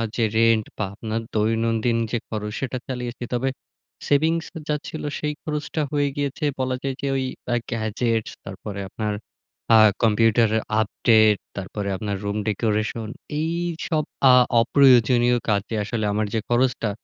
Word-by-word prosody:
যে 115 - +1
রেন্ট 115 -1 +4
বা 105 - -1
আপনার 110 +1 -3
দৈনন্দিন 115 +2 +1
যে 120 - +1
খরচ 105 -1 -4
সেটা 130 -1 -2
চালিয়েছি। 125 -2 -5
তবে 130 +2 0 0.6
সেভিংস 160 +3 +2 0.2
যা 150 - +1
ছিলো 155 -2 -5
সেই 150 0 -2
খরচটা 150 0 -3
হয়ে 145 -1 +1
গিয়েছে 145 +1 -3 0.2
বলা 130 0 0
যায় 135 -1 -2
যে, 140 - -1
ওই 135 - 0 0.3
আ - - +3 0.2
গ্যাজেটস 115 0 -1
তারপরে 100 +1 -7
আপনার 105 0 -3 0.6
আ - - +8 0.3
কম্পিউটারের 110 0 +3 0.2
আপডেট, 110 -1 +4 0.2
তারপরে 100 +1 -4
আপনার 100 0 -3
রুম 100 +1 -2
ডেকোরেশন 110 +1 -1 0.3
এইসব 170 -1 -1 0.3
আ - - +7 0.3
অপ্রয়োজনীয় 125 -2 +5
কাজে 105 +2 0
আসলে 110 0 -2
আমার 110 +1 0
যে 110 - +1
খরচটা 120 -2 +1
115 Hz, 140 wpm, -23 LUFS, 110-135 Hz, 0.6 s, আ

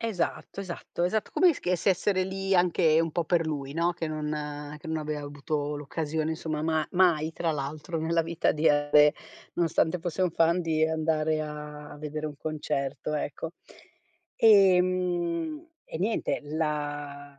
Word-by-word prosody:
Esatto, 210 -3 -3
esatto, 175 -2 -5
esatto. 210 +4 0
Come 365 - +5
esc 300 - -6 0.2
essere 190 0 +2
lì 195 +1 -1
anche 170 -3 +4
un 165 0 0
po' 170 +2 -1
per 165 0 +1
lui, 140 -3 -3
no, 170 +3 +1
che 170 -1 -4
non 150 -1 -4
che 150 - -12
non 160 0 -1
aveva 150 -1 -4
avuto 145 +1 -3
l'occasione, 155 +2 -2
insomma, 160 -1 -3
ma 160 -1 +1
mai 170 -4 +3
tra 165 0 -1
l'altro 150 +4 -4
nella 165 +1 +1
vita 165 0 0
di 155 +1 +2
andare, 145 0 +5 0.4
nonostante 165 0 +1
fosse 175 +1 -4
un 180 - +2
fan, 165 +2 +3
di 160 -2 +1
andare 160 -1 0
a 150 -1 -7
a - - -10
vedere 155 +1 -4
un 145 -2 -7
concerto, 150 -1 -3
ecco. 150 +2 -4 0.8
Ehm, 185 - +3 0.2
e 160 - -7
niente, 215 +5 0
la 145 -2 -4
160 Hz, 155 wpm, -28 LUFS, 150-175 Hz, 0.8 s, Come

